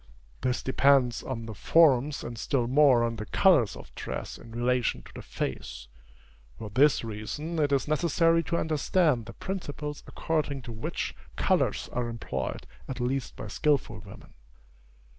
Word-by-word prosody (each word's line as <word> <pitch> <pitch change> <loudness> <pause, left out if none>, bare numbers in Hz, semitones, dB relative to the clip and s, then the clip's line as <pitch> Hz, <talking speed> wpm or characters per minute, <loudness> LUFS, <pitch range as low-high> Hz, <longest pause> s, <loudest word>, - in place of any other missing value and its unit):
This 125 -1 -1
depends 130 -2 +3
on 115 -4 -5
the 110 - -6
forms 145 +2 +3
and 120 - -6
still 120 +2 0
more 130 -2 +5
on 115 -1 -1
the 110 0 -6
colors 155 - +4
of - - -12
dress - - -6
in 120 - -13
relation 120 +1 0
to - - -15
the - - -8
face. 65 -1 -5 0.7
For 110 -2 -7
this 135 +6 +4
reason, 115 +10 -4
it 145 -2 +2
is 140 +1 +1
necessary 165 +2 +3
to 170 +1 -1
understand 155 -5 +1
the 115 - -8
principles 150 -5 -5
according 145 -4 -2
to 120 - -7
which 110 0 -4 0.2
colors - - +1
are 120 -1 -1
employed 90 - -4 0.2
at 130 -1 -5
least 130 +1 -2
by - - -7
skilful 135 -2 0
women. 100 -1 -13
130 Hz, 155 wpm, -28 LUFS, 115-150 Hz, 0.7 s, more